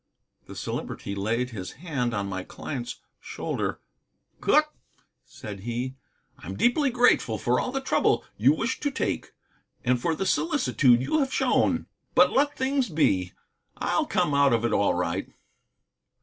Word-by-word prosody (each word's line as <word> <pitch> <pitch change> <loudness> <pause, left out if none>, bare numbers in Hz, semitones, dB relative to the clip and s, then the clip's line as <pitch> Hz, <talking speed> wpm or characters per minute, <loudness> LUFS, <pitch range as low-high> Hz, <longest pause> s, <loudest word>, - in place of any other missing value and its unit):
The - - -9
Celebrity 100 - -4
laid 115 +5 -1
his 95 -4 -6
hand 140 -6 -2
on 100 -3 -2
my 95 -1 -4
client's 125 +2 -6 0.2
shoulder. - - -4 0.6
"Cooke," - - +3 0.5
said 105 -2 -9
he, 120 +5 -3 0.5
"I'm 95 +3 -7
deeply 275 +4 +3
grateful 245 0 +3
for - - +1
all 255 - -2
the 270 +1 -2
trouble 265 - +2
you 125 +7 +5
wish 225 +11 -1
to 290 - 0
take, 275 - -3 0.5
and 125 -1 +2
for 165 +2 0
the 195 - -2
solicitude 190 - +3
you 310 - +1
have 270 -2 0
shown. - - +2 0.3
But - - +6
let 285 +2 +2
things 265 -2 0
be. 95 - +1 0.4
I'll - - 0
come 150 - +1
out 140 -2 +4
of 115 0 +1
it - - 0
all 100 -3 +2
right." 90 -1 -2
130 Hz, 150 wpm, -26 LUFS, -, 0.6 s, But